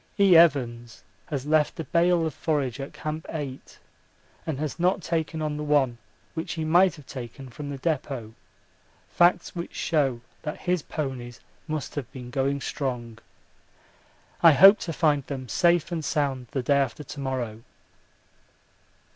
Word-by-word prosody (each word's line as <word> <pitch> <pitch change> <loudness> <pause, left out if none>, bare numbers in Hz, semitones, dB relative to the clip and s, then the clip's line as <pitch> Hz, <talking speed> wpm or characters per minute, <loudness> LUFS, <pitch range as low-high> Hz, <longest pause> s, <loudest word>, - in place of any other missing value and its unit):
E. 195 -3 +6
Evans 120 -8 +3 0.2
has 140 -3 -3
left 150 +1 +2
a - - -1
bale 170 +3 +2
of 160 - -2
forage 140 -5 -1
at 135 - -5
Camp 155 +1 -5
8 140 -4 -6 0.7
and 155 -4 -2
has 150 +3 -4
not 180 +1 +2
taken 160 -1 -2
on 150 -1 -2
the 150 - -4
one 140 -5 +2 0.3
which 160 0 -4
he 160 -1 -3
might 175 +2 +4
have 150 -4 -14
taken 130 +1 -8
from 145 +4 -7
the 140 - -5
depôt 135 -6 -3 0.8
facts 175 +1 +3
which 170 0 -6
show 140 -7 +1 0.2
that 150 - -5
his 180 -2 0
ponies 130 -6 -5 0.3
must 155 -3 -4
have 135 -4 -5
been 125 -2 -9
going 135 +2 0
strong. 120 -5 -4 1.2
I 165 -2 +8
hope 195 +8 +8
to 170 - -4
find 150 -2 +2
them 130 -3 -5
safe 170 +4 +2
and 165 -2 -2
sound 135 -4 -1
the 135 -4 -2
day 140 +3 +3
after 140 +2 -1
to 145 - -9
morrow. 125 -5 -3
145 Hz, 155 wpm, -26 LUFS, 130-160 Hz, 1.2 s, I